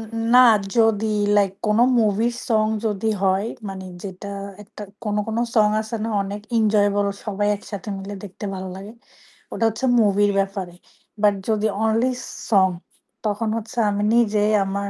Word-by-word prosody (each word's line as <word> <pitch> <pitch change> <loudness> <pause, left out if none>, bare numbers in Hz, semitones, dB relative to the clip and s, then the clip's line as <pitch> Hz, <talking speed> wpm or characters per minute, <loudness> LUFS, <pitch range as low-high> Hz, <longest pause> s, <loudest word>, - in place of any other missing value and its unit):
উ - - -3 0.2
না 250 - +9 0.4
যদি 220 -1 +3 0.3
লাইক 200 -2 +3
কোন 210 +1 +2 0.2
মুভির 220 +2 +1
সং 220 -3 +3 0.2
যদি 215 +1 -1
হয় 190 +3 +2 0.2
মানে 190 -1 -7 0.2
যেটা 195 +1 -7 0.3
একটা 210 0 -11 0.2
কোন, 210 -1 -2
কোন, 225 +1 -2 0.2
সং 210 -1 +5
আছে 220 +1 -5
না 225 - -2
অনেক 205 +1 -6 0.2
enjoyable 205 -2 +2 0.2
সবাই 205 -1 -1
একসাথে 205 0 -8
মিলে 195 +1 -7
দেখতে 205 +1 -8
ভালো 185 0 -6
লাগে, 195 +3 -9 0.6
ওটা - - -2
হচ্ছে 225 +5 -4
মুভির 205 -1 +3
ব্যাপারে। 195 -3 -3 0.5
বাট 210 -1 +5 0.2
যদি 215 0 +1 0.2
অনলি 225 +3 +2 0.4
সং 190 -3 +5 0.6
তখন 215 +1 -1
হচ্ছে 225 +2 -8
আমি 205 0 -1
নিজেই 215 -2 +3
আমার 200 +1 -3
210 Hz, 155 wpm, -22 LUFS, 200-220 Hz, 0.6 s, না